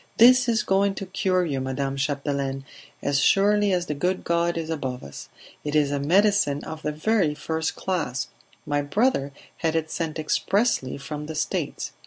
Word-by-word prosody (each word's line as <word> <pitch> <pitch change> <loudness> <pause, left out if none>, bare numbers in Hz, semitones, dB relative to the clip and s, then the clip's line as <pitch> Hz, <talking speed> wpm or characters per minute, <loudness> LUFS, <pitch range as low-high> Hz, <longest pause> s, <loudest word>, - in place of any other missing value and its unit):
"This 250 +1 +7
is 225 -2 +2
going 195 +1 +2
to 195 - -5
cure 185 -1 +1
you, 140 -5 -2
Madame 135 +1 -2
Chapdelaine, 140 -1 -2 0.4
as 140 0 +2
surely 205 +5 +4
as 180 -1 +1
the 150 - -2
good 180 +6 -1
God 170 0 +1
is 165 -1 -3
above 130 -5 -3
us. 70 - -9 0.3
It 150 0 -3
is 145 -2 +3
a 145 - 0
medicine 180 -1 +3
of 160 0 -7
the 150 - -1
very 160 0 +1
first 160 +1 -2
class; 155 -9 -2 0.4
my 145 0 0
brother 145 - +1 0.3
had 165 -1 0
it 160 -1 -1
sent 165 -2 -3
expressly 160 - 0
from 150 +1 -6
the 160 - -6
States. 155 - -2
160 Hz, 175 wpm, -25 LUFS, 140-190 Hz, 0.4 s, This